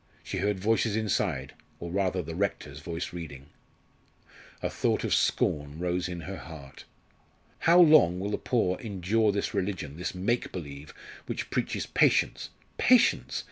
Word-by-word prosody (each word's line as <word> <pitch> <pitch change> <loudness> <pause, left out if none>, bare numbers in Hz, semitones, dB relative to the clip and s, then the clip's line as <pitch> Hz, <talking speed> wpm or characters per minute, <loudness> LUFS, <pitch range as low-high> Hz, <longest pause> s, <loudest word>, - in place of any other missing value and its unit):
She 95 - -4
heard 100 0 0
voices 110 +1 +1
inside 90 -10 -1 0.3
or 85 0 -6
rather 95 -1 0
the 80 +1 -6
rector's 80 -6 -3
voice 85 +3 -5
reading. 75 -5 -8 1.1
A - - +2
thought - - 0
of - - 0
scorn 75 0 +1
rose 90 +1 -1
in 90 -1 -5
her 95 +3 -6
heart. 75 -5 -11 0.7
"How 170 +2 +5
long 150 - +6
will 100 +2 -3
the - - -1
poor 95 -7 0
endure 105 +1 +1
this 100 +2 -2
religion 90 -7 -3
this 90 +1 -4
make 115 +7 -1
believe 75 -4 -8 0.4
which - - -4
preaches - - -1
patience, - - +2 0.3
patience! 250 -1 +4
90 Hz, 145 wpm, -28 LUFS, 80-105 Hz, 1.1 s, long